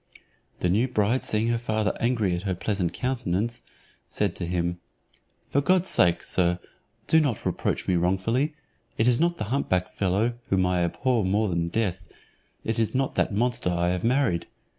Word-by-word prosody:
The 90 - +2
new 110 +7 +2
bride 120 +1 +1
seeing 110 +2 0
her 120 0 +1
father 110 -2 -1
angry 115 -6 +1
at 85 - -2
her 95 -1 -2
pleasant 95 -2 -1
countenance, 120 -3 -2 0.5
said 100 -4 -1
to 85 - -3
him, 85 0 -1 0.7
"For 140 - +2
God's 185 +4 +2
sake, 85 -1 +3
sir, 90 -1 +1 0.5
do 160 - +5
not 140 -8 -1
reproach - - -1
me 90 - +2
wrongfully; 115 - +1 0.4
it 110 - +2
is 120 -1 +4
not 170 +1 +2
the - - -3
hump 140 - -1
back 90 0 0
fellow, 105 +5 0
whom 95 -1 +3
I 90 -1 +1
abhor 120 +6 +1
more 100 +3 +1
than 85 -1 0
death, 95 -1 -1 0.6
it 110 0 -2
is 115 +2 0
not 135 0 0
that - - +1
monster 120 0 0
I 85 0 +1
have 90 0 -1
married. 125 -8 +1
105 Hz, 180 wpm, -26 LUFS, 90-120 Hz, 0.7 s, do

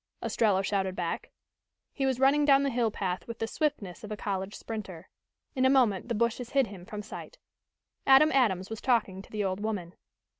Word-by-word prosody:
Ostrello 200 -4 +2
shouted 190 -2 -1
back. 170 -2 -3 0.6
He 270 -2 0
was 260 -2 0
running 275 +3 +4
down 280 -1 +5
the 275 - 0
hill 235 -2 +1
path 185 -4 -3
with 230 -1 -6
the 225 - -1
swiftness 225 - -2
of 210 - -8
a 210 - -3
college 195 -1 -3
sprinter. 190 -6 -7 0.5
In 260 - +1
a 260 - +5
moment 235 -7 +3
the 235 - 0
bushes 235 +2 0
hid 275 -2 +3
him 195 -4 -10
from 210 -1 -6
sight. 360 - -9 0.7
Adam 270 +3 +7
Adams 210 -8 +2
was 225 - -5
talking 215 -7 +1
to - - -16
the 210 -1 -2
old 190 0 -1
woman. 205 -5 -3
220 Hz, 195 wpm, -29 LUFS, 190-260 Hz, 0.7 s, Adam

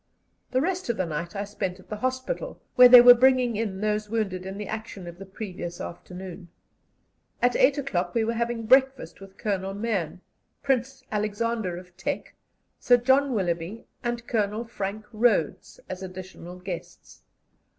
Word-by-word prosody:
The 255 - +1
rest 365 -1 -2
of 235 - 0
the 185 - 0
night 165 +4 -5
I 200 - -2
spent 195 -2 -4
at 185 - -17
the 210 - -4
hospital, 260 - -3 0.2
where 250 -1 +9
they 245 -1 +11
were 245 0 +10
bringing 250 -1 +3
in 205 -3 -3
those 210 0 -1
wounded 195 -5 -2
in 195 +1 -6
the 210 - -5
action 215 -4 -6
of 170 +1 -10
the 195 - -9
previous 180 -3 -7
afternoon. 180 0 -8 0.9
At 245 0 +2
eight 275 +3 +4
o'clock 185 -11 -2
we 230 - +3
were 230 +1 0
having 235 0 -2
breakfast 260 -8 +3
with 195 0 -13
Colonel 195 -2 -2
Mahon, 200 -6 -2 0.4
Prince 270 0 -1
Alexander 210 -2 -1
of 180 0 -12
Teck, - - -4 0.5
Sir 245 - +5
John 265 +2 +3
Willoughby, 175 +2 -2 0.2
and 240 -1 -3
Colonel 215 -1 -1
Frank 210 -1 -5
Rhodes, 215 -8 +1
as 185 0 -6
additional 185 -1 -9
guests. 180 -1 -8
210 Hz, 160 wpm, -26 LUFS, 185-240 Hz, 0.9 s, they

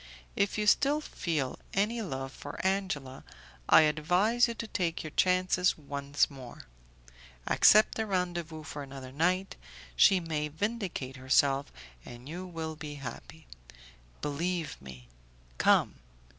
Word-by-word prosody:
If 200 +1 0
you 210 - 0
still 285 +7 +4
feel 160 - -3 0.2
any 215 +4 +1
love 135 -8 -5
for 145 +1 -9
Angela, 180 -9 -2 0.5
I - - +8
advise 180 +11 +3
you 235 - -4
to 230 - -5
take 175 -6 -2
your 155 - -7
chances 185 +1 +2
once 140 -1 -1
more. 130 -4 -11 0.8
Accept 215 +1 +5
a 220 - -1
rendezvous 175 -4 -2
for 145 -1 -7
another 135 -2 -9
night; 180 +7 0 0.4
she 185 - +6
may 155 -3 -2
vindicate 170 - -4
herself, 135 +1 +2 0.3
and 120 +2 -11
you 180 +4 -6
will 160 -2 -5
be 150 -1 -7
happy. 135 -4 -9 0.8
Believe 160 +1 -2
me; 65 -2 -12 0.5
come. - - +4
160 Hz, 130 wpm, -30 LUFS, 140-190 Hz, 0.8 s, I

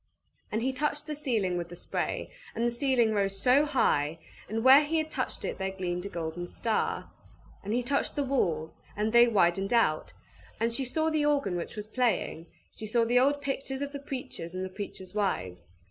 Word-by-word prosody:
And 220 +2 -1
he 265 +1 0
touched 295 +2 -1
the 305 - -4
ceiling 225 -11 0
with 170 -1 -4
the 175 - -8
spray, - - -3 0.2
and 230 - 0
the 240 - +2
ceiling 240 -3 +2
rose 195 -1 0
so 255 +7 +5
high, 160 - +2 0.3
and 225 +2 -1
where 265 +3 +9
he 320 +2 0
had 315 0 -1
touched - - -3
it - - -4
there 190 0 -1
gleamed 180 -1 -3
a - - -7
golden 170 0 -4
star. 225 +4 -1 0.5
And 205 - -4
he 245 +2 +1
touched 280 +3 0
the 285 - +1
walls, 170 - -1 0.2
and 215 +2 0
they 235 0 +8
widened 195 -1 +2
out, 155 -10 +2 0.5
and 230 +1 +1
she 265 +2 -1
saw 315 +5 0
the 305 -1 +2
organ 280 -11 +1
which 175 - -4
was 210 -1 -5
playing; 215 -8 -1 0.3
she 215 - -6
saw 230 +2 +2
the 245 +2 +4
old 285 +2 +3
pictures 275 0 -3
of 285 - -4
the 285 - -5
preachers 255 -11 -6
and 185 0 -2
the - - -5
preachers' 190 -2 -7
wives. 90 - -2
230 Hz, 205 wpm, -29 LUFS, 185-270 Hz, 0.5 s, where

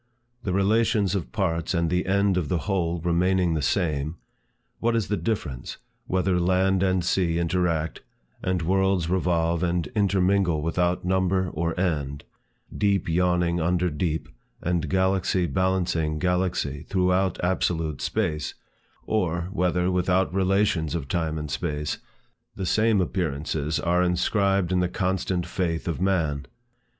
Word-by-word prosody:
The 100 - -3
relations 100 +1 +2
of 95 -5 -3
parts 85 -3 -1
and 85 0 +1
the 90 +1 0
end 100 0 +2
of 90 -5 -1
the 85 -5 -1
whole 85 -4 0
remaining 90 +1 +2
the 80 - -1
same, 75 -3 0 0.6
what 115 0 +1
is 110 -4 0
the 105 - +1
difference, 90 - -3 0.3
whether 90 -1 +1
land 95 +1 +2
and 95 -2 +1
sea 90 -2 +1
interact, 85 -2 0 0.4
and 90 -2 -1
worlds 95 -1 +1
revolve 85 -2 +1
and 85 -1 0
intermingle 95 -5 +2
without 90 +2 0
number 95 0 +1
or 85 +2 -2
end, 75 -6 -1 0.5
deep 100 -3 +1
yawning 90 0 +1
under 90 +1 +1
deep, 80 0 -2 0.3
and 85 -3 -1
galaxy 95 0 +1
balancing 85 -2 0
galaxy, 90 -5 0
throughout 95 0 +1
absolute 80 -4 0
space, 80 -9 -1 0.5
or, 90 -5 -1
whether, 90 -1 +1
without 90 +1 +1
relations 95 -4 +1
of 75 -5 -3
time 80 -2 -1
and 75 -1 -5
space, 75 +1 -2 0.6
the 95 - -3
same 110 +1 +3
appearances 80 -4 -1
are 85 +1 +2
inscribed 95 +1 +1
in 90 - +2
the 90 -1 +1
constant 90 -1 -1
faith 85 -3 -2
of 85 +1 -2
man? 80 -7 0
90 Hz, 135 wpm, -25 LUFS, 85-95 Hz, 0.6 s, same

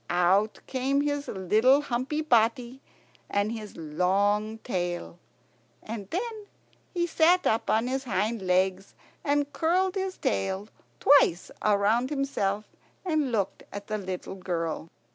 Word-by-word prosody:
Out 185 +5 +2
came 270 +2 0
his 290 0 -1
little 220 +9 +3
humpy 270 +3 -2
body 240 0 +2 0.5
and 205 +2 0
his 215 -3 -7
long 200 +7 +1
tail. 175 -4 -3 0.6
And 210 -3 -6
then 430 +2 -4 0.4
he 345 -1 0
sat 345 +2 +3
up 220 - +1
on 220 +2 +2
his 265 +2 -2
hind 220 0 -1
legs, 185 +1 0 0.3
and 290 0 0
curled 360 +5 +1
his 385 -1 -3
tail 190 - -1 0.3
twice 270 -11 +4
round 215 +4 +2
himself 215 -8 -1 0.4
and 310 -7 0
looked 200 -4 -1
at 205 0 -7
the 215 0 -3
little 185 -1 -5
girl. 165 -4 -3
220 Hz, 125 wpm, -27 LUFS, 190-280 Hz, 0.6 s, twice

